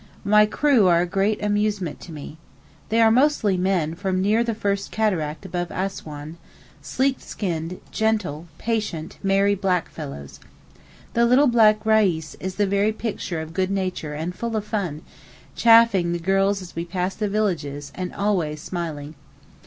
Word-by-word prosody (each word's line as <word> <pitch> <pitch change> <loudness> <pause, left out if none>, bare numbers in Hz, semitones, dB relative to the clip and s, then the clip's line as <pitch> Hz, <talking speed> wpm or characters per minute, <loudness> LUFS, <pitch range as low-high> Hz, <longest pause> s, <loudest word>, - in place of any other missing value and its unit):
My 210 +1 +5
crew 255 -4 +3
are 170 -1 +4
a - - +1
great 195 +4 0
amusement 205 -5 -1
to 175 - -10
me. 150 0 -9 0.5
They 225 - +2
are 225 -1 +6
mostly 250 -6 +3
men 180 -4 0
from 185 +1 -2
near 210 +5 +2
the 230 -2 -2
first 200 -2 -1
Cataract 165 -9 -1
above 175 -1 -3
Assouan, 160 -5 -5 0.4
sleek 265 0 0
skinned, 175 -2 -4
gentle, 210 -8 -1
patient, 210 -8 -3
merry 195 +1 +3
black 185 -3 0
fellows. 70 0 -8 0.7
The 235 0 +3
little 255 +4 +5
black 220 -4 +4
Reis 195 -8 +2
is 185 0 -5
the 205 - +2
very 200 +2 +2
picture 205 -7 -4
of 160 0 -8
good 185 +1 0
nature 185 -6 -3
and 160 +4 -4
full 230 +3 -4
of 210 -1 -2
fun, 180 -9 -3 0.5
'chaffing' 225 -7 +5
the - - 0
girls 195 +2 +1
as 175 - -12
we 165 - -2
pass 180 +2 -2
the 210 0 -2
villages, 150 -9 -2
and 180 -1 -4
always 175 -7 0
smiling. 155 -3 -5
195 Hz, 160 wpm, -23 LUFS, 170-215 Hz, 0.7 s, are